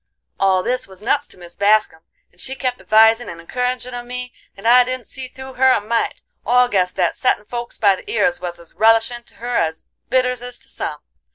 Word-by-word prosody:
"All 190 Hz, -1 st, +3 dB
this 255 Hz, +4 st, -2 dB
was 190 Hz, +1 st, -14 dB
nuts 285 Hz, +5 st, +1 dB
to -, -, -19 dB
Mis 175 Hz, -1 st, -12 dB
Bascum, 205 Hz, -5 st, +2 dB, 0.3 s
and -, -, -13 dB
she 265 Hz, 0 st, -4 dB
kep' 255 Hz, -2 st, -2 dB
advisin' 225 Hz, +2 st, +4 dB
and 170 Hz, -, -8 dB
encouragin' 250 Hz, +4 st, -3 dB
of 245 Hz, 0 st, -5 dB
me, 250 Hz, 0 st, -5 dB, 0.2 s
and 195 Hz, -, -4 dB
I 250 Hz, +1 st, +8 dB
didn't 255 Hz, -1 st, -4 dB
see 260 Hz, +3 st, -8 dB
through 265 Hz, +1 st, -10 dB
her 260 Hz, +1 st, +4 dB
a 255 Hz, -, +4 dB
mite, 225 Hz, +3 st, -2 dB, 0.2 s
or 250 Hz, +2 st, +4 dB
guess 185 Hz, -6 st, +1 dB
that 180 Hz, -3 st, 0 dB
settin' 250 Hz, -5 st, +1 dB
folks 240 Hz, +2 st, -6 dB
by 200 Hz, -3 st, +4 dB
the 295 Hz, -, -11 dB
ears 265 Hz, -, +1 dB
was 175 Hz, -1 st, -5 dB
as 170 Hz, -1 st, -15 dB
relishin' 225 Hz, +2 st, +3 dB
to -, -, -14 dB
her 240 Hz, +1 st, -2 dB
as 160 Hz, -1 st, -1 dB, 0.3 s
bitters 250 Hz, -1 st, +1 dB
is 245 Hz, 0 st, -7 dB
to -, -, -16 dB
some. -, -, -5 dB
240 Hz, 215 wpm, -20 LUFS, 200-250 Hz, 0.3 s, I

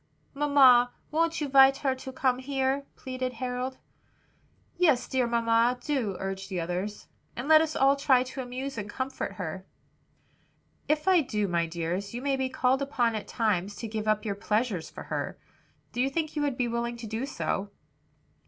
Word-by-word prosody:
"Mamma, 270 Hz, -4 st, +5 dB, 0.2 s
won't 330 Hz, +2 st, +1 dB
you 295 Hz, -, 0 dB
'vite 270 Hz, 0 st, +6 dB
her 265 Hz, -, +3 dB
to 260 Hz, 0 st, -8 dB
come 255 Hz, -1 st, +1 dB
here?" 270 Hz, +1 st, -1 dB
pleaded 255 Hz, -1 st, -4 dB
Harold. 250 Hz, +2 st, -3 dB, 1.0 s
"Yes, 310 Hz, -8 st, +3 dB
dear 255 Hz, -2 st, +1 dB
mamma, 235 Hz, +1 st, +2 dB
do," 245 Hz, -9 st, -2 dB
urged 195 Hz, 0 st, -4 dB
the 185 Hz, -3 st, -2 dB
others, 180 Hz, +5 st, -4 dB, 0.3 s
"and 245 Hz, +4 st, -5 dB
let 315 Hz, 0 st, +8 dB
us 315 Hz, -1 st, -1 dB
all 275 Hz, +1 st, +4 dB
try 270 Hz, -3 st, +3 dB
to 260 Hz, +1 st, -6 dB
amuse 255 Hz, 0 st, -5 dB
and 205 Hz, 0 st, -6 dB
comfort 260 Hz, +4 st, -4 dB
her." 185 Hz, 0 st, -5 dB, 1.2 s
"If 305 Hz, +3 st, 0 dB
I 370 Hz, -3 st, +6 dB
do, 210 Hz, -7 st, -1 dB
my 170 Hz, -2 st, 0 dB
dears, 175 Hz, +5 st, -3 dB
you 245 Hz, -, -4 dB
may 280 Hz, -1 st, +1 dB
be 265 Hz, -1 st, -1 dB
called 260 Hz, +1 st, +1 dB
upon 245 Hz, -4 st, +1 dB
at 215 Hz, -, -4 dB
times 205 Hz, -4 st, 0 dB
to 230 Hz, -, -5 dB
give 215 Hz, 0 st, -4 dB
up 215 Hz, +1 st, +1 dB
your 205 Hz, -, -1 dB
pleasures 210 Hz, -3 st, -1 dB
for -, -, -9 dB
her. -, -, -4 dB, 0.5 s
Do 245 Hz, -, -1 dB
you 265 Hz, -, +2 dB
think 310 Hz, +2 st, -2 dB
you 300 Hz, -, 0 dB
will 290 Hz, -, +2 dB
be 250 Hz, -2 st, -1 dB
willing 235 Hz, 0 st, -2 dB
to 235 Hz, -, -8 dB
do 225 Hz, +5 st, -3 dB
so?" 200 Hz, -7 st, -2 dB
250 Hz, 180 wpm, -28 LUFS, 215-270 Hz, 1.2 s, let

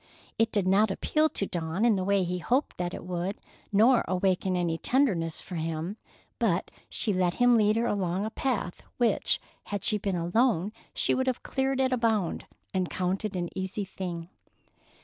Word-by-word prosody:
It 225 Hz, 0 st, +3 dB
did 205 Hz, -3 st, +1 dB
not 200 Hz, +3 st, +4 dB
appeal 305 Hz, +10 st, +1 dB
to 200 Hz, -, -2 dB
Dawn 170 Hz, +4 st, -1 dB
in 230 Hz, -3 st, +5 dB
the 190 Hz, -, -1 dB
way 200 Hz, 0 st, +2 dB
he 180 Hz, 0 st, -2 dB
hoped 255 Hz, -, 0 dB
that 175 Hz, 0 st, -2 dB
it -, -, -8 dB
would, 180 Hz, +2 st, -3 dB, 0.3 s
nor 225 Hz, +5 st, +5 dB
awaken 185 Hz, 0 st, +1 dB
any 170 Hz, -2 st, 0 dB
tenderness 190 Hz, -, +1 dB
for 180 Hz, -, -6 dB
him, 165 Hz, +4 st, -3 dB, 0.4 s
but -, -, +1 dB, 0.2 s
she 210 Hz, -, +1 dB
let 180 Hz, -2 st, +1 dB
him 245 Hz, -1 st, +5 dB
lead 215 Hz, -1 st, +4 dB
her 230 Hz, +1 st, +1 dB
along 195 Hz, -3 st, 0 dB
a 220 Hz, -, -4 dB
path 225 Hz, -10 st, -2 dB, 0.2 s
which, 240 Hz, -2 st, +3 dB, 0.3 s
had 205 Hz, -1 st, -4 dB
she 210 Hz, -, +3 dB
been 195 Hz, -2 st, -1 dB
alone, 185 Hz, +2 st, +1 dB, 0.2 s
she -, -, +2 dB
would 260 Hz, 0 st, 0 dB
have 255 Hz, -2 st, -1 dB
cleared 265 Hz, 0 st, -1 dB
at 260 Hz, -1 st, +2 dB
a -, -, +2 dB
bound, 220 Hz, -7 st, 0 dB, 0.3 s
and 185 Hz, -2 st, 0 dB
counted 190 Hz, +3 st, -2 dB
an 175 Hz, -1 st, -2 dB
easy 190 Hz, +2 st, -3 dB
thing. 175 Hz, -3 st, -6 dB
195 Hz, 185 wpm, -28 LUFS, 180-225 Hz, 0.4 s, in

